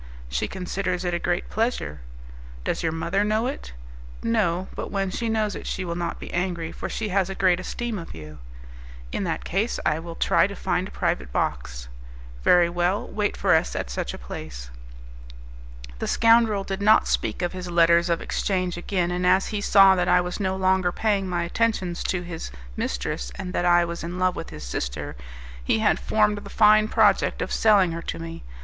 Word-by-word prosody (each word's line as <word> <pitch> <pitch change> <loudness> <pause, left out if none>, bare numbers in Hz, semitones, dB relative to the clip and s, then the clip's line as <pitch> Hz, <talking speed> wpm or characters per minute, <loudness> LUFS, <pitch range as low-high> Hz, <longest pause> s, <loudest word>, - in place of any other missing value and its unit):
"She - - -1
considers 185 -1 -3
it 175 - 0
a 175 - 0
great 175 +1 -1
pleasure." 220 - -2 0.6
"Does - - -1
your 160 - 0
mother 170 +5 0
know 215 +2 +1
it?" 270 +3 -5 0.5
"No; 190 -6 +1
but - - -5
when 195 -2 -1
she 230 +4 -2
knows 215 -2 0
it - - -7
she 185 - -3
will 170 - -3
not 175 0 -3
be - - -8
angry, 175 -2 -2
for - - -6
she 220 -2 -3
has 190 -1 +1
a 195 - -4
great 180 -2 +3
esteem 215 0 -4
for 165 - -10
you." 75 -1 -10 0.7
"In - - -2
that - - -2
case 205 +6 -1
I 155 0 +2
will 165 0 -8
try - - +3
to - - -8
find - - -1
a - - -11
private 65 -2 -2
box." - - -2 0.6
"Very 175 -1 +5
well; 175 +3 0
wait 210 -1 -2
for 190 -2 +3
us 160 - +2
at 60 - -3
such - - -3
a - - -7
place." - - -8 1.3
The - - -2
scoundrel 230 -3 +4
did 195 0 -4
not 215 +2 +5
speak - - -1
of 175 - -1
his 180 -1 -6
letters 170 0 +4
of 170 - +1
exchange 185 -3 -1
again, 175 0 -1
and 180 0 -2
as 185 +2 +3
he 210 -1 -2
saw 195 -1 +7
that 180 -1 0
I 180 - +5
was 180 +2 -3
no 190 -2 0
longer 190 -1 +2
paying 200 -2 0
my 175 -1 -1
attentions 185 -2 -1
to 180 -1 -1
his 175 - -6 0.3
mistress, 60 0 -3
and 180 0 -6
that 175 - 0
I 175 0 +5
was 170 -1 -5
in 175 +2 -5
love 185 0 +1
with - - -6
his 75 - -9
sister, - - -4 0.5
he 90 - +2
had 110 - +2
formed 210 -1 +2
the - - -11
fine 215 0 +5
project - - +3
of - - -6
selling 205 -5 +4
her 165 0 -4
to - - -5
me. 165 0 -7
180 Hz, 200 wpm, -24 LUFS, 170-200 Hz, 1.3 s, saw